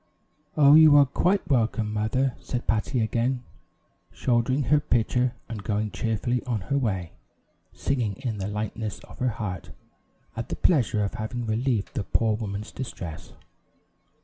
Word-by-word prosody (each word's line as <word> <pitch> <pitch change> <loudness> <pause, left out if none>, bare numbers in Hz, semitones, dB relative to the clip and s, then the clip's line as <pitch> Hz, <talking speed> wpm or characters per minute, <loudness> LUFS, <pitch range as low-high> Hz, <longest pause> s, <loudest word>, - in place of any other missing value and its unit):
"Oh, 145 -1 +7
you 155 -1 +8
are 140 - +7
quite 180 +9 +1
welcome, 110 -4 +1
mother," 120 +5 0
said 125 -1 -4
Patty 115 +3 0
again, 120 +3 0 0.7
shouldering 125 +3 +1
her 145 +4 +4
pitcher, 125 -1 +1
and 110 -4 -6
going 105 0 -1
cheerfully 115 +2 -1
on 115 -5 -1
her 140 +9 -1
way, 95 -9 -2 0.6
singing 120 -7 -1
in 120 -6 -4
the 95 - -2
lightness 105 +1 -4
of - - -14
her 125 - +2
heart, 105 -6 -5 0.7
at 115 +2 -5
the - - -2
pleasure 120 - +2
of 100 - -2
having 120 +2 -4
relieved 115 -1 -1
the 115 -7 -2
poor 110 +1 +1
woman's 105 -1 -5
distress. 90 -8 -7
115 Hz, 150 wpm, -26 LUFS, 105-130 Hz, 0.7 s, you